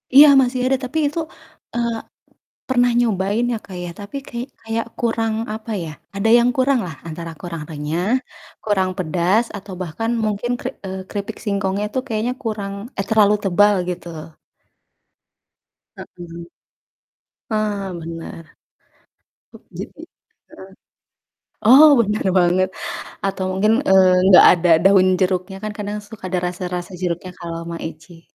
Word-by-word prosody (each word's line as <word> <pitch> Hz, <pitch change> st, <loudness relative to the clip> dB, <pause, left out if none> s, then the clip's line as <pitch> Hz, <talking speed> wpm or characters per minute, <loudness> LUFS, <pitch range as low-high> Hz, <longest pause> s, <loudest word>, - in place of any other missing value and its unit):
Iya, 295 Hz, +2 st, +11 dB
masih 250 Hz, 0 st, 0 dB
ada, 265 Hz, 0 st, +2 dB
tapi 290 Hz, +6 st, -4 dB
itu, 300 Hz, +3 st, -3 dB, 0.6 s
eee, 235 Hz, -1 st, 0 dB, 0.7 s
pernah 245 Hz, -1 st, +3 dB
nyobain 210 Hz, 0 st, +1 dB
ya, 230 Hz, -, -1 dB
Kak, 185 Hz, -2 st, -9 dB
ya. 175 Hz, -, -5 dB
Tapi 205 Hz, +8 st, -7 dB
kayak 240 Hz, +2 st, -5 dB
kayak 225 Hz, 0 st, -2 dB
kurang, 225 Hz, -2 st, 0 dB, 0.2 s
apa 220 Hz, +1 st, -7 dB
ya, 160 Hz, -, -6 dB, 0.3 s
ada 200 Hz, +3 st, +1 dB
yang 240 Hz, +1 st, +3 dB
kurang 265 Hz, 0 st, +2 dB
lah, 165 Hz, -4 st, -7 dB
antara 165 Hz, +1 st, -6 dB
kurang 170 Hz, -2 st, -6 dB
renyah, 155 Hz, +4 st, -3 dB, 0.6 s
kurang 195 Hz, -3 st, +1 dB
pedas, 185 Hz, +6 st, +1 dB
atau 195 Hz, -1 st, -9 dB
bahkan 185 Hz, +6 st, -3 dB, 0.2 s
mungkin 215 Hz, +3 st, -1 dB
keri 255 Hz, -, -3 dB, 0.2 s
eee, 190 Hz, 0 st, -5 dB
keripik 205 Hz, +1 st, -5 dB
singkongnya 200 Hz, -1 st, -1 dB
itu, 260 Hz, -, -1 dB
kayaknya 225 Hz, +1 st, -1 dB
kurang 210 Hz, -3 st, -3 dB, 0.3 s
eh, 195 Hz, -, 0 dB
terlalu 210 Hz, -2 st, +5 dB
tebal, 205 Hz, +2 st, +4 dB, 0.2 s
gitu 180 Hz, 0 st, -5 dB
loh. 155 Hz, +1 st, -8 dB, 1.7 s
Heeh. 170 Hz, -1 st, -10 dB, 1.0 s
Ah, 210 Hz, -2 st, -1 dB
bener. 165 Hz, 0 st, -8 dB, 1.1 s
Tu -, -, -14 dB, 0.2 s
jadi -, -, -9 dB, 0.5 s
heeh. 190 Hz, -, -12 dB, 1.0 s
Oh, 270 Hz, +7 st, +9 dB
bener 210 Hz, -1 st, 0 dB
banget 180 Hz, +1 st, +3 dB, 0.6 s
atau 195 Hz, -1 st, -2 dB
mungkin, 205 Hz, +4 st, +2 dB, 0.2 s
eee, 190 Hz, -1 st, +6 dB, 0.2 s
nggak 190 Hz, -2 st, +9 dB
ada 175 Hz, 0 st, +2 dB
daun 190 Hz, -1 st, +6 dB
jeruknya, 185 Hz, +1 st, 0 dB
kan 215 Hz, -, -3 dB
kadang 205 Hz, 0 st, -4 dB
suka 220 Hz, -3 st, -12 dB
ada 180 Hz, 0 st, 0 dB
rasa-rasa 180 Hz, 0 st, -5 dB
jeruknya 180 Hz, 0 st, -3 dB
kalau 165 Hz, -1 st, -5 dB
Maicih. 165 Hz, 0 st, -8 dB
195 Hz, 140 wpm, -20 LUFS, 180-225 Hz, 1.7 s, Iya